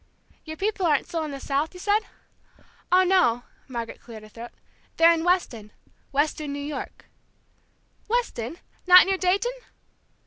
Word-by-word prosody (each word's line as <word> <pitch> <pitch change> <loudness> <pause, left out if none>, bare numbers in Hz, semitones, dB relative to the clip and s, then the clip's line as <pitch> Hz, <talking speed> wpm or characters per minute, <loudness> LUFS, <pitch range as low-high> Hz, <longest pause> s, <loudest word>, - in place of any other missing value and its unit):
"Your 315 0 -7
people 390 -1 -1
aren't 295 -3 +2
still 330 -2 -3
in - - -6
the 275 -1 -7
South, 290 +5 -2
you - - -10
said?" 410 +3 +2 0.9
"Oh, 370 +1 +6
no!" 350 -11 +2 0.2
Margaret 235 -3 -6
cleared 225 -3 -11
her 215 - -14
throat. 235 +2 -10 0.5
"They're 330 +1 +6
in 325 -1 -2
Weston 255 - -1 0.4
Weston, 295 +1 -1
New 285 - -5
York." 270 - -8 1.0
"Weston! 385 - -2 0.3
Not 365 0 +9
near 385 0 -1
Dayton?" 390 +6 +1
320 Hz, 145 wpm, -25 LUFS, 260-370 Hz, 1.0 s, Not